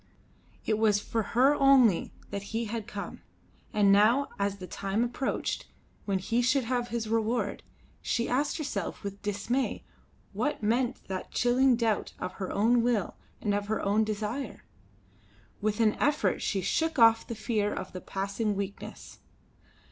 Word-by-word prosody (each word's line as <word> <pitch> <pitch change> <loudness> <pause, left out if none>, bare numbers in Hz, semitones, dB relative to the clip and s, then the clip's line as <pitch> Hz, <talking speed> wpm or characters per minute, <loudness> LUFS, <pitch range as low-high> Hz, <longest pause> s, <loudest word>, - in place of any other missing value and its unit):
It 215 -1 +1
was 210 -2 +4
for 225 +2 -2 0.2
her 270 +3 +6
only 270 - +5 0.2
that 200 -1 -3 0.2
he 230 - -1
had 220 -1 -4
come; 200 - -6 0.5
and 205 -2 +4
now 220 +8 +4
as 200 0 0
the 185 - -7
time 200 +4 -1
approached 245 +2 -2 0.4
when 195 -2 +1
he 230 +6 0
should 260 +2 +2
have 245 0 -1
his 230 -1 -3
reward, 225 -1 0 0.4
she 235 -1 0
asked 280 +4 0
herself 300 -7 -4
with 200 0 -6
dismay 210 +6 -1 0.5
what 295 -7 -2
meant 240 +4 0
that 190 -1 -4
chilling 250 +1 +3
doubt 230 -3 0
of - - -4
her 190 - -2
own 230 +4 +3
will 230 -6 0 0.3
and 205 - 0
of 205 0 -1
her 220 - 0
own 205 +2 +2
desire? 215 +4 -4 1.0
With 210 +1 0
an 220 -2 +4
effort 290 0 +1
she 195 - 0
shook 320 - 0
off 225 -2 +6
the 230 - -4
fear 215 -2 0
of 185 - -5
the 185 - -6
passing 200 +2 -2
weakness. 200 0 -6
220 Hz, 155 wpm, -29 LUFS, 205-245 Hz, 1.0 s, her